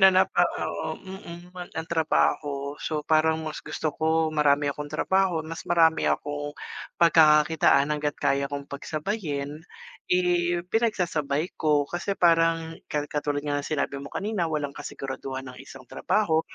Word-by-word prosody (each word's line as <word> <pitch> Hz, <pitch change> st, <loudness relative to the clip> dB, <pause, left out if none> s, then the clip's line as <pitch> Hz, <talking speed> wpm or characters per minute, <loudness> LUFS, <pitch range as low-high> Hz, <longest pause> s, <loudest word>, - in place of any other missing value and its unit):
Na 190 Hz, -, +9 dB
napa 185 Hz, 0 st, +3 dB, 0.2 s
oo, -, -, -3 dB
mm, 180 Hz, -2 st, -10 dB
an 180 Hz, -1 st, -8 dB
ng 160 Hz, 0 st, -4 dB
trabaho. 145 Hz, -3 st, +1 dB
So 150 Hz, -2 st, -3 dB
parang 160 Hz, 0 st, +3 dB
mas 155 Hz, -, -5 dB
gusto 155 Hz, -2 st, -3 dB
ko 160 Hz, 0 st, +1 dB
marami 145 Hz, -1 st, +3 dB
akong 150 Hz, +1 st, -6 dB
trabaho, 175 Hz, +2 st, +1 dB
mas 165 Hz, +1 st, -6 dB
marami 165 Hz, -2 st, +4 dB
akong 145 Hz, 0 st, -2 dB, 0.4 s
pagkakakitaan 150 Hz, -3 st, +5 dB
hangga't 150 Hz, 0 st, -2 dB
kaya 140 Hz, 0 st, +1 dB
kong 140 Hz, -1 st, -5 dB
pagsabayin, 150 Hz, 0 st, -4 dB, 0.5 s
eh, 175 Hz, -1 st, +2 dB
pinagsasabay 175 Hz, -9 st, 0 dB
ko. 150 Hz, -2 st, +3 dB
Kasi 175 Hz, +6 st, -3 dB
parang 165 Hz, -1 st, +3 dB, 0.2 s
ka 145 Hz, -1 st, -1 dB
katulad 145 Hz, 0 st, -2 dB
nga 145 Hz, -1 st, 0 dB
ng -, -, -7 dB
sinabi 140 Hz, -1 st, -2 dB
mo 140 Hz, -, -8 dB
kanina, 200 Hz, -3 st, -2 dB
walang 145 Hz, -3 st, -2 dB
kasiguraduhan 135 Hz, -1 st, -6 dB
ang 125 Hz, -, -14 dB
isang 135 Hz, -1 st, -12 dB
trabaho. 160 Hz, -, +1 dB
155 Hz, 145 wpm, -26 LUFS, 145-170 Hz, 0.5 s, Na